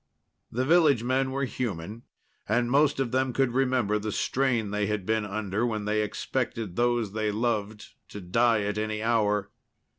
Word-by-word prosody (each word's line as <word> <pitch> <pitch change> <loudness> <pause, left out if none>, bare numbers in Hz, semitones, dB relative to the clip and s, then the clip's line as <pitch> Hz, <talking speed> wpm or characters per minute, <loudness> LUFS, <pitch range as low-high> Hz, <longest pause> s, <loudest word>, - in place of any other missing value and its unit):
The 125 +3 -1
village 150 -6 +4
men 130 +2 +1
were 135 +1 -1
human, 110 -4 -4 0.5
and 120 +2 +1
most 145 +1 +3
of 130 -4 -1
them 130 0 0
could 135 -1 +1
remember 125 -5 +1
the 105 0 -3
strain 120 -3 0
they 105 0 0
had 105 -3 -2
been 110 0 0
under 105 +1 -2
when 110 -3 -1
they 105 +1 +1
expected 110 -2 -3
those 120 -3 +1
they 110 -1 -1
loved 105 -2 -2 0.2
to 105 - -8
die 110 +4 +2
at 105 +1 -2
any 110 0 -2
hour. 105 -3 +1
110 Hz, 170 wpm, -27 LUFS, 105-125 Hz, 0.5 s, village